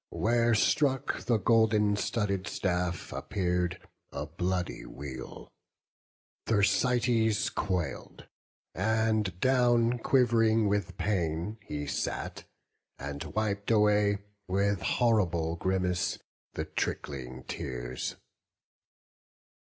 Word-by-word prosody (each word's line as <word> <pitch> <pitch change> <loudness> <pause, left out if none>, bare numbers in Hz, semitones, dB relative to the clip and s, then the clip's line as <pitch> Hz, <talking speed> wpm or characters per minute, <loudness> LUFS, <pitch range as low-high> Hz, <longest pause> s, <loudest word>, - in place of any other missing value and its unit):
Where 115 0 +2
struck 135 +4 +2
the 120 -2 +3
golden 105 -1 +3
studded 100 -2 -1
staff, 90 -1 -2
appear'd 90 -1 -1 0.3
A 70 - -4
bloody 90 +3 -2
weal: 65 -2 -8 1.0
Thersites 115 +1 +2
quail'd, 90 -4 -3 0.5
and 110 -2 +1
down, 120 -1 +3
Quiv'ring 115 -3 +3
with 100 -2 -1
pain, 90 +1 -1
he 75 -8 -5
sat, 70 - -3 0.5
and 70 +1 -5
wip'd 100 -2 -1
away. 105 -2 +4 0.3
With 100 0 +1
horrible 85 -9 +1
grimace, 90 0 0 0.4
the - - -2
trickling 65 -2 -4
tears. 60 -1 -4
100 Hz, 85 wpm, -30 LUFS, 90-110 Hz, 1.0 s, away